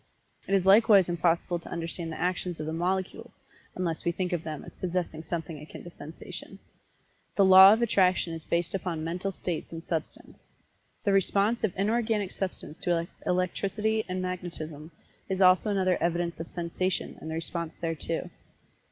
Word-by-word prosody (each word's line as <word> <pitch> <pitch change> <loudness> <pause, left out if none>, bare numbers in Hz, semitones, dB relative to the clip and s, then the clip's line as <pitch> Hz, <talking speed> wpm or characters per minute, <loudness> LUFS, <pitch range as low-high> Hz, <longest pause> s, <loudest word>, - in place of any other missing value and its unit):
It 195 - +2
is 190 -1 +2
likewise 200 -1 +6
impossible 170 0 +1
to - - -11
understand 165 0 -4
the 155 - -6
actions 180 -1 -1
of 155 - -3
the 160 - -3
Molecules, 185 +3 -2 0.4
unless 170 -3 -2
we 170 - +1
think 180 +1 -2
of 175 - 0
them 155 -2 -6
as - - -11
possessing 175 -3 -3
something 160 -1 -5
akin 150 - -10
to 175 - -10
Sensation. 155 0 -9 0.8
The 200 - +5
Law 190 +1 +10
of 230 +2 +1
Attraction 185 -6 +2
is 160 -1 -6
based 170 +1 -1
upon 175 -4 -3
Mental 180 +4 -2
States 175 -3 -4
in 165 0 -7
Substance. 160 -3 -5 0.6
The 200 - +2
response 200 +4 +2
of 215 - +2
Inorganic 215 -1 0
Substance 185 -5 -5
to 170 -1 0 0.2
Electricity 200 +4 0
and 185 0 -2
Magnetism 165 -4 -5 0.4
is 190 -1 -1
also 185 +2 +5
another 185 -3 +1
evidence 170 0 -1
of 165 - -5
Sensation 180 +2 -2
and 160 - -6
the 160 - -3
response 165 0 -3
thereto. 165 -3 -3
180 Hz, 165 wpm, -28 LUFS, 165-190 Hz, 0.8 s, Law